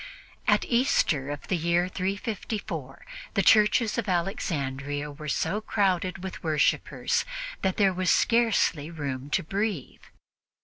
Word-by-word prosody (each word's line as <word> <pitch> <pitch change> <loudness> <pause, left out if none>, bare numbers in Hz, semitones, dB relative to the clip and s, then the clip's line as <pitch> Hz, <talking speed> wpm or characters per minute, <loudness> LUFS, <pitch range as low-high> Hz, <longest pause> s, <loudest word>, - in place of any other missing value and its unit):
At - - +4
Easter 165 - +2
of 145 0 -6
the 185 - +1
year 170 +1 +1
354, 190 - -4 0.3
the 200 - +3
churches 215 +2 +4
of 225 - -3
Alexandria 145 -5 -2
were 150 +1 -9
so 210 +8 0
crowded 185 -4 0
with 190 - -6
worshippers 155 -2 +1 0.4
that 190 -1 0
there 195 -3 +4
was 185 0 0
scarcely 225 -10 +2
room 140 -4 -5
to - - +1
breathe. 195 - -3
180 Hz, 125 wpm, -27 LUFS, 150-200 Hz, 0.4 s, At